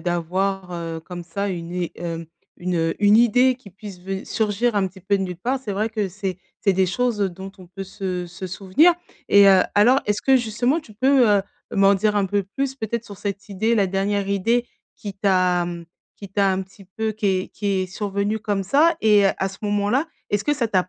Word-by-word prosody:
d'avoir, 180 +2 -2
heu, 165 -1 -5
comme 175 +1 -8
ça 200 +4 -3
une 170 -2 -5
i 180 -1 -3
hem, 165 -1 -5 0.3
une, 180 0 -2
heu 165 0 0
une 205 +1 +6
idée 245 +3 +4
qui 240 -6 -15
puisse 195 -1 -10
ven 190 +2 -5
surgir 220 +2 0
un 195 -2 +2
petit 190 +1 -11
peu 200 +2 +1
de 195 - -2
nulle 180 -2 -4
part, 255 +8 -1
c'est 220 -6 -5
vrai 210 +3 -1
que 215 -3 -2
c'est 190 -1 -4 0.2
c'est 200 - +3
des 190 0 +3
choses, 230 +3 0
heu, 195 - +1
dont 190 +2 -9
on 185 - -14
peut 195 +2 -8
se 185 -2 -4
se 175 +2 -8
souvenir 195 - +3 0.4
et 200 0 +8
heu, 190 -1 +6
alors, 245 +7 +5
est-ce 210 0 0
que, 265 -1 +4
justement, 245 +5 0
tu 220 - -16
peux, 260 +3 +4
heu, 200 -1 +4 0.3
m'en 200 -2 +5
dire 210 +2 +1
un 200 -1 +2
peu 200 +1 0
plus, 265 +7 -3
peut-être, 235 -2 -4
sur 205 - -10
cette 200 +1 -5
idée, 220 +4 0
la 200 -3 +3
dernière 195 +1 -1
idée 230 +5 +1 0.3
qui 200 -3 -7
t'a, 185 -3 +2
mmh 170 -1 -6 0.3
qui 200 - -10
t'a 195 0 +2
un 190 0 -1
petit 190 +1 -16
peu 220 +4 -3
qui 215 0 -3
est 185 - -5
qui 205 - -5
est 190 -2 +1
survenue 200 +2 -2
comme 200 -3 -1
ça? 315 - +3
Et 210 -2 +5
heu, - - +5
à 190 - 0
ce 195 - -11
moment-là, 205 +8 +1 0.2
est-ce 205 0 +1
que 295 - +2
ça 250 -5 0
t'a 185 -3 +1
200 Hz, 230 wpm, -22 LUFS, 185-215 Hz, 0.4 s, et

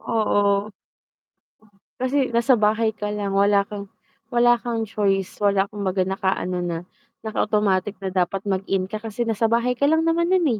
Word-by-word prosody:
Oo. 205 -2 +1 1.3
Kasi 260 +1 +1
nasa 235 +2 +3
bahay 220 0 +2
ka 210 0 -4
lang, 205 -1 -3
wala 200 0 +3
kang 200 -1 -8 0.4
wala 240 0 +3
kang 230 -2 -2
choice, 195 -3 -1
wala 200 -1 +3
kang 205 0 -9
'baga 185 -1 0
naka-ano 190 -2 -1
na, 175 -2 -2 0.5
naka-automatic 210 -2 0
na 190 -1 -3
dapat 190 +2 -1
mag-in 195 -1 -1
ka 215 +2 -6
kasi 225 +1 -3
nasa 225 0 0
bahay 235 +2 +2
ka 280 +3 +1
lang 320 +1 +2
naman 340 +1 +1
nun 370 -3 +3
210 Hz, 160 wpm, -23 LUFS, 195-235 Hz, 1.3 s, nasa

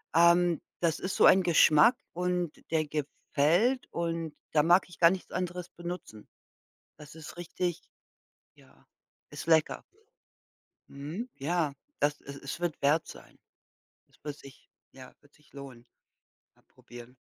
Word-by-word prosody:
ähm, 170 0 +5 0.2
das 165 -2 +1
ist 185 - -3
so - - +5
ein 190 - +7
Geschmack 170 +6 +6 0.2
und 180 -1 -1 0.2
der 155 -1 +1
gefällt 155 - 0
und 165 -2 -3 0.2
da 150 - +4
mag 175 +3 +5
ich 175 - -15
gar 170 -1 +7
nichts 190 -1 -5
anderes 180 -1 -4
benutzen. 175 -11 -8 0.7
Das 150 0 -13
ist 160 +1 -10
richtig 175 0 -4 0.7
ja, - - -23 0.4
ist - - -8
lecker. 160 -2 +2 1.1
Mhm, 155 - -6
ja, 155 0 -1 0.3
das 145 0 0
es 140 0 -9
es 140 +4 -7
wird 175 -4 -3
wert 150 +3 +2
sein. - - -13 0.7
Das - - -28
wird 145 -1 -5
sich 140 -2 -16 0.2
ja, 130 -1 -13
wird 145 0 -26
sich 150 - -26
lohnen 135 -4 -11 0.7
mal - - -30
probieren. 120 +1 -14
165 Hz, 140 wpm, -29 LUFS, 145-175 Hz, 1.1 s, ein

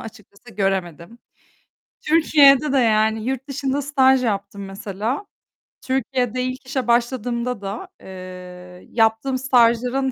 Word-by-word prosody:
açıkçası 220 0 -13
göremedim. 195 +1 -3 0.8
Türkiye'de 300 -3 +4
de - - +3
yani 220 -2 +2
yurt 265 +1 -3
dışında 275 0 -2
staj 265 -2 +3
yaptım 200 -2 -3
mesela. 205 - -4 0.6
Türkiye'de 255 -1 -1
ilk 255 +1 -5
işe 260 -3 -3
başladığımda 240 -1 -1
da, 200 - -6
eee, 180 -1 -11
yaptığım 225 +3 +1
stajların 250 +1 +2
235 Hz, 105 wpm, -21 LUFS, 200-265 Hz, 0.8 s, Türkiye'de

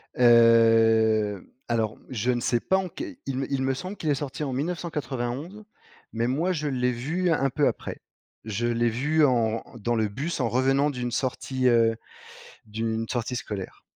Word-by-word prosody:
Heu, 115 -3 +4 0.2
alors 110 -2 -1
je 125 0 0
ne 120 - 0
sais 120 +1 +1
pas 190 - +1
en 190 -1 -2
quel 300 - -7
il 135 -1 -3
me 135 +1 -3
il 135 -1 0
me 135 0 +1
semble 185 +9 -6
qu'il 155 - -3
est 145 - +3
sorti 145 +1 -5
en 135 - -3
1991, 150 - -4 0.5
mais 115 +1 0
moi 155 +9 0
je 150 -3 -2
l'ai 125 -2 0
vu 160 +10 -1
un 135 -3 +2
peu 145 +3 +1
après. - - -4 0.4
Je 110 +2 -2
l'ai 120 0 +1
vu 150 +7 +2
en 115 -4 +1
dans 120 +2 -1
le 110 -1 +1
bus 145 +11 -4
en 125 - +1
revenant 135 +3 +2
d'une 125 -3 -3
sortie 130 +1 -1
heu, 115 -2 +4 0.7
d'une 110 +1 -3
sortie 120 +1 -2
scolaire. 100 -5 -6
125 Hz, 175 wpm, -26 LUFS, 115-145 Hz, 0.7 s, Heu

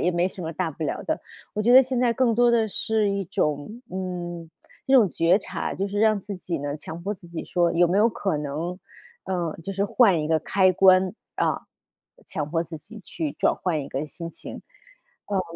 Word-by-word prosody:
也 180 - +2
没 175 0 +1
什 185 -1 -7
么 165 +1 -4
大 175 +1 -1
不 160 - -8
了 - - -2
的。” 315 0 -1 0.3
我 215 - -1
觉 240 - +4
得 260 - +10
现 260 -1 -2
在 240 -2 +3
更 235 -1 +2
多 240 +1 +4
的 230 -2 +3
是 215 0 0
一 200 0 -1
种， 180 +2 -2
嗯， 175 -3 -5 0.4
这 265 - +1
种 225 -7 +7
觉 170 +4 +3
察， 185 -3 -4
就 195 - -2
是 200 +1 -3
让 215 -1 +3
自 200 +1 -6
己 175 -3 -4
呢 145 +1 -3
强 165 +2 -8
迫 205 +3 -2
自 180 -2 -15
己 170 -1 -6
说 175 -1 +1
有 170 0 +4
没 185 - +1
有 225 +3 +5
可 195 -6 -1
能， 155 +5 -4 0.5
呃， 175 -4 -2
就 195 - -4
是 195 +1 0
换 195 -7 +4
一 150 - -3
个 160 -1 +3
开 185 +3 +3
关， 185 +1 +5 0.2
啊， - - 0 0.6
强 150 -1 -4
迫 165 -1 +1
自 165 -1 -8
己 215 +8 -13
去 160 -5 -4
转 - - +1
换 170 -5 -1
一 140 - -7
个 145 +3 -3
心 165 +2 -8
情。 - - -9 0.7
嗯， 200 -2 +1
185 Hz, 235 characters per minute, -25 LUFS, 165-205 Hz, 0.7 s, 得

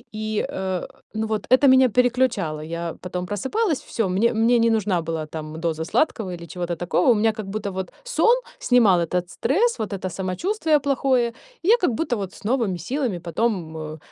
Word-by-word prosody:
и, 215 0 -1
э, 190 -1 -3 0.3
ну, 220 0 -2
вот 215 -1 -2
это 260 +2 +6
меня 260 -1 +6
переключало. 240 -10 +1
Я 170 +1 -4
потом 180 0 -4
просыпалась, 265 - -1
всё, 225 -5 0
мне 205 +7 +2
мне 230 +2 +3
не 230 0 +4
нужна 210 -6 +1
была 160 -1 -4
там 155 0 -7
доза 160 -1 -2
сладкого 220 - 0
или 170 -1 -8
чего-то 175 0 -3
такого. 175 +6 +2
У - - +4
меня 220 +1 +3
как 215 -1 -7
будто 200 0 -4
вот 190 0 -5
сон - - +3 0.2
снимал 220 -8 +4
этот 175 +2 0
стресс, 405 - +1
вот 215 -2 -3
это 185 -1 -3
самочувствие 300 - 0
плохое. 265 -3 +1 0.4
И - - -3
я 460 +4 +7
как 360 - +1
будто 245 -2 -1
вот 195 -2 -5
с - - -15
новыми 230 -8 +1
силами 245 - -2
потом, 170 -2 -2
э, 155 0 -6
210 Hz, 190 wpm, -23 LUFS, 175-250 Hz, 0.4 s, я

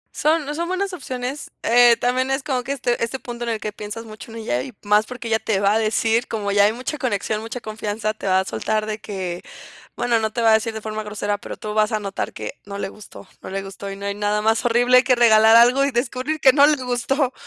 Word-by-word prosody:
Son, 310 +1 +1
no, 295 - -4
son 340 +3 -3
buenas 375 +1 -2
opciones, 260 -3 -5
eh, 240 0 +6
también 255 +2 0
es 270 +1 -1
como 265 -4 -1
que 270 - -5
este, 245 -4 -1
este 230 +3 -2
punto 240 -2 -7
en 235 - -3
el 225 - -2
que 215 -1 -5
piensas 210 +2 -7
mucho 220 +1 -11
en 230 - -8
ella, 125 - -2
y - - -7
más 210 +1 +3
porque 245 -2 -7
ella 220 -1 +1
te 210 -4 -1
va 200 +1 +3
a 220 - +2
decir, 225 +2 +1
como 205 -3 -3
ya 200 0 +5
hay 210 - +3
mucha 255 +5 -5
conexión, 215 -3 -1
mucha 230 +2 -6
confianza, 215 0 -3
te 215 - -7
va 190 0 +4
a - - -6
soltar 215 +2 -1
de 215 0 -4
que, 185 -4 -5 0.5
bueno, 235 -2 +1
no 220 0 -1
te 235 - -2
va 225 - +5
a - - +6
decir 220 +1 +2
de 220 - -6
forma 215 0 -4
grosera, 205 -1 -3
pero - - -8
tú 210 -1 -5
vas 215 0 +2
a 215 - 0
notar 200 -1 -4
que, - - -6
no 200 0 -7
le 200 - -3
gustó, 205 -1 -13
no - - -8
le 195 0 -4
gustó, 195 +1 -8
y - - -6
no 200 0 -8
hay 200 - -1
nada 210 +1 0
más 225 +2 +2
horrible 245 +2 +5
que 255 -2 +3
regalar 220 -2 +6
algo 245 +4 +6
y - - +1
descubrir 255 +5 -2
que 265 -2 +6
no 285 +1 +6
le 305 - +4
gustó, 255 +2 0
225 Hz, 265 wpm, -21 LUFS, 210-250 Hz, 0.5 s, eh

